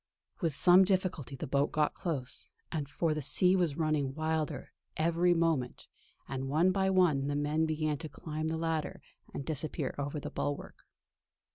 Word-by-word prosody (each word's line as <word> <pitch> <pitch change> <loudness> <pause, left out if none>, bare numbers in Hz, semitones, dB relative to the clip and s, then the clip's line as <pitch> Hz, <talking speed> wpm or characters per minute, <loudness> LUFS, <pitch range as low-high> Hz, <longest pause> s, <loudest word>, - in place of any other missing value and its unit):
With 165 -7 -1
some 180 +5 +7
difficulty 185 -8 -1
the - - -5
boat 140 +2 +1
got 150 -1 +1
close, 140 -8 -3 0.4
for 160 +2 0
the 155 - -3
sea 180 +6 +4
was 170 -6 +1
running 150 -4 0
wilder 155 -1 -2 0.3
every 170 +2 +3
moment; 160 -7 0 0.4
and 135 0 -4
one 165 +6 +3
by 190 0 +1
one 170 -8 +3
the 145 - -1
men 150 +2 +1
began 155 -2 -1
to 155 - -5
climb 155 0 -4
the 160 0 -1
ladder 160 -1 -2 0.3
and 140 - -5
disappear 155 -2 -2
over 145 +2 -3
the - - -6
bulwark. 145 0 -4
155 Hz, 160 wpm, -31 LUFS, 145-170 Hz, 0.4 s, some